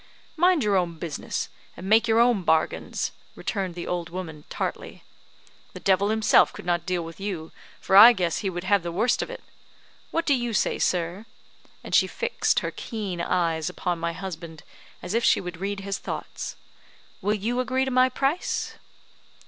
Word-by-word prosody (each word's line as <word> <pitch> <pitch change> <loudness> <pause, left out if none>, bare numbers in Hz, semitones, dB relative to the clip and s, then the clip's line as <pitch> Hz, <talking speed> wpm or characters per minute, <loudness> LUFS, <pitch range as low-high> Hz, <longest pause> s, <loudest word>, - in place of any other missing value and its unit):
"Mind 350 -3 +4
your 205 -2 +3
own 170 -2 -1
business, 160 -3 -4 0.3
and 185 - -7
make 225 +3 +5
your 225 0 +4
own 235 -4 +4
bargains," 160 -2 0 0.2
returned 190 -5 -3
the 175 - -5
old 175 -1 -3
woman, 165 -4 -7
tartly. - - -5 0.7
"The - - -8
devil 195 +1 +2
himself 220 0 +4
could - - -10
not 175 +1 0
deal 180 -2 0
with 165 +2 -10
you, 185 -5 -4 0.3
for 190 - +1
I 220 +5 +11
guess 180 -7 -1
he 195 - -1
would 175 -1 -5
have 200 +1 +3
the 170 0 -4
worst 225 +8 +1
of - - -4
it. - - -8 0.7
What 330 0 -1
do 285 - +4
you 240 -3 -1
say, - - +1
sir?" 180 +5 -1 0.6
and - - -8
she - - +5
fixed 475 0 0
her - - -3
keen 200 -7 -5
eyes 170 -2 0
upon 180 -1 -2
my 170 0 -2
husband, 165 -4 -7 0.4
as 180 +3 -4
if 230 +1 +1
she - - +4
would 180 -2 -6
read 200 0 -3
his 195 0 -3
thoughts. - - -6 0.7
"Will 205 +2 +1
you 230 +5 -2
agree 260 +1 +1
to 265 - -2
my 255 0 +4
price?" 275 +6 -1
195 Hz, 180 wpm, -25 LUFS, 175-225 Hz, 0.7 s, I